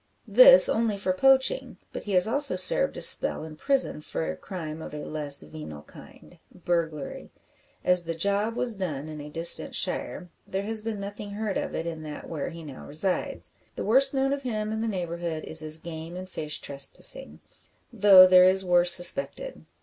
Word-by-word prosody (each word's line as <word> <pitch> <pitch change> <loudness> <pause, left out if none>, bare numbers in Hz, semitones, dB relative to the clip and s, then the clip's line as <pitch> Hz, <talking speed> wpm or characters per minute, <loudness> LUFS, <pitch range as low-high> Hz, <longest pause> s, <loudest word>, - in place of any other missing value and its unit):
This - - +8
only 225 -2 0
for 190 -1 -1
poaching; 270 - +2 0.2
but - - -7
he 205 - -4
has 180 +2 +4
also 285 +5 +1
served - - +2
a - - -6
spell - - +5
in 155 -1 -10
prison 270 - +1
for 160 - -4
crime 160 -4 -8
of 150 - -9
a 150 - -7
less 145 - -3
venal 75 -1 -10
kind 175 - -17
burglary. 165 -5 -4 0.6
As 180 0 +3
the 165 -1 -5
"job" 200 +6 -1
was 245 -1 -1
done 155 -7 -5
in 155 -1 -8
a 145 - -9
distant 165 +3 +1
shire, 180 -2 -3 0.2
there 195 +1 -4
has 220 +1 -4
been 220 -1 -5
nothing 205 +1 -8
heard 210 -1 -4
of - - -5
it 165 - -4
in 165 -2 -6
that 150 -1 -9
where 155 -4 -5
he 165 0 -10
now 140 -4 -11
resides. 180 +6 -3 0.2
The - - -5
worst 265 +6 +4
known 270 0 0
of 280 - -4
him 215 -4 -4
in 220 0 -3
the 230 - -2
neighbourhood 170 -5 -4
is 160 - -6
his 155 0 -5
game 165 +1 -9
and 185 +1 -8
fish 155 -4 -4
trespassing, 140 - -4 0.5
though 195 -4 +8
there 185 0 +6
is 190 +1 +2
worse 175 0 +4
suspected. 275 - 0
180 Hz, 190 wpm, -26 LUFS, 160-220 Hz, 0.6 s, This